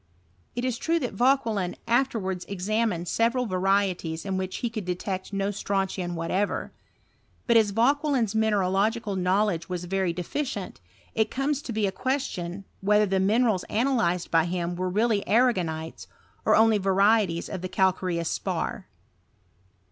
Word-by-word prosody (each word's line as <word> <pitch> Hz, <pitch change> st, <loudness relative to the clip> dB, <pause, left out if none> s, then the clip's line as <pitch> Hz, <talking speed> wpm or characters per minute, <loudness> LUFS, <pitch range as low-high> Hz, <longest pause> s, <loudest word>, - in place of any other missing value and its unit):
It 245 Hz, +1 st, -2 dB
is 250 Hz, -2 st, -1 dB
true 330 Hz, +1 st, +1 dB
that 250 Hz, -9 st, -3 dB
Vauquehna 225 Hz, -5 st, +1 dB
fterwards 225 Hz, -8 st, 0 dB
examined 200 Hz, -2 st, -1 dB
several 235 Hz, +6 st, +1 dB
varieties 185 Hz, -4 st, 0 dB
in 195 Hz, -1 st, -2 dB
which 185 Hz, 0 st, -3 dB
he -, -, 0 dB
could 215 Hz, -3 st, -4 dB
detect 185 Hz, +2 st, -4 dB
no 195 Hz, 0 st, -1 dB
strontian 190 Hz, -3 st, -2 dB
whatever; 185 Hz, +5 st, -1 dB, 0.7 s
but 235 Hz, -, +3 dB
as 220 Hz, -2 st, +5 dB
Vauquelin's 250 Hz, +1 st, +2 dB
mine 220 Hz, -1 st, +2 dB
nlogical 200 Hz, +3 st, +1 dB
knowledge 185 Hz, -1 st, +1 dB
was 180 Hz, -1 st, -3 dB
very 190 Hz, 0 st, 0 dB
deficient, 190 Hz, -, -4 dB, 0.3 s
it 220 Hz, 0 st, +1 dB
comes 280 Hz, +2 st, -1 dB
to 245 Hz, -, -6 dB
lie 220 Hz, -, -1 dB
a -, -, -1 dB
question, 195 Hz, -7 st, -3 dB, 0.2 s
whether 210 Hz, +2 st, +4 dB
the 195 Hz, -1 st, 0 dB
minerals 210 Hz, 0 st, +2 dB
analyzed 220 Hz, -8 st, 0 dB
by 165 Hz, -1 st, +4 dB
him 175 Hz, 0 st, -2 dB
"were 185 Hz, +1 st, -2 dB
really 215 Hz, +2 st, +2 dB
arragonites, 180 Hz, -10 st, +1 dB, 0.4 s
or -, -, +5 dB
only 220 Hz, -1 st, +5 dB
varieties 195 Hz, -2 st, +2 dB
of 190 Hz, -, -5 dB
calcaie 185 Hz, -1 st, 0 dB
<nui 170 Hz, -, -1 dB
spar. -, -, -3 dB
200 Hz, 145 wpm, -26 LUFS, 180-230 Hz, 0.7 s, as